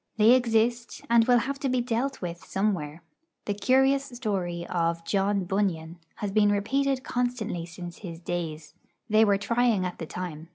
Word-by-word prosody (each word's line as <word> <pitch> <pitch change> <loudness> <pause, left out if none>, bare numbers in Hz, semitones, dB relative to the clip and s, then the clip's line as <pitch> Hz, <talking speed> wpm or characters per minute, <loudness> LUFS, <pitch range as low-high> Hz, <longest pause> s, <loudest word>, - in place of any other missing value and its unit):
They 220 +2 +6
exist, 235 -1 +1
and 230 -1 +5
will 245 -1 +6
have 270 +4 -2
to 275 - -1
be 255 0 +1
dealt 245 +1 -2
with 170 -1 -5
somewhere. 175 -6 -2 0.4
The 205 - -1
curious 265 +5 +3
story 195 -10 -3
of 165 -1 -1
John 195 +1 +1
Bunyan 175 -3 -2 0.2
has 205 -2 -4
been 205 0 +4
repeated 265 +6 0
constantly 235 -8 -2
since 175 0 -9
his 170 -5 -8
days. 165 -3 -5 0.4
They 215 +1 +6
were 200 -2 +4
trying 230 -1 +1
at 180 - -5
the 160 - -5
time. 165 -3 -6
205 Hz, 165 wpm, -27 LUFS, 175-245 Hz, 0.4 s, They